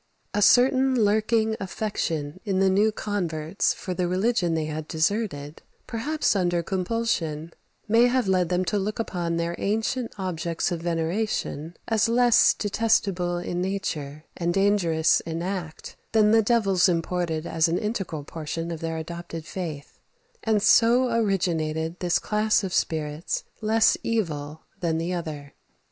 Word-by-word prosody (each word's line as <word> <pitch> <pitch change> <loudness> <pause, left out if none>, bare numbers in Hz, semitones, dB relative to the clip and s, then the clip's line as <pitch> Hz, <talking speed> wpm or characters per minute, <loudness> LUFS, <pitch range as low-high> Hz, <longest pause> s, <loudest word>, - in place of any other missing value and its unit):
A 205 - 0
certain 260 +4 +5
lurking 220 0 +2
affection 180 -6 -3
in 195 -3 -1
the 190 0 +3
new 210 +3 +3
converts 180 -5 -1
for 185 - -5
the 180 0 -1
religion 185 -2 +1
they 160 -1 -1
had 155 0 -5
deserted, 160 -4 -2 0.2
perhaps 290 +4 -1
under 175 -3 +1
compulsion, 180 -5 -2 0.3
may 230 +3 +5
have 250 -3 +1
led 185 -3 +2
them 180 +1 +1
to 205 - 0
look 210 +2 -3
upon 175 -6 -2
their 170 0 -1
ancient 225 +4 -1
objects 170 -2 -2
of 170 -2 -3
veneration 170 -1 -2
as 225 0 +2
less 240 0 +5
detestable 195 -5 0
in 175 0 -3
nature, 155 -6 -3
and 175 0 -1
dangerous 190 -5 +3
in 165 +1 -5
act, 180 -4 -5 0.2
than 215 -1 +5
the 225 0 +6
devils 200 -5 +3
imported 165 -1 -1
as 160 -1 +1
an 165 +2 0
integral 195 -8 -3
portion 165 +2 -5
of 165 - -5
their 165 0 -3
adopted 165 0 -7
faith; 160 -5 -6 0.4
and 215 -3 +1
so 240 +3 +5
originated 170 -6 0
this 175 -1 +1
class 215 0 +1
of 185 -2 -3
spirits 155 0 -1 0.2
less 220 +1 +4
evil 160 -9 -2 0.2
than 165 -2 0
the 170 +2 -2
other. 150 -5 -6
180 Hz, 145 wpm, -25 LUFS, 165-215 Hz, 0.4 s, the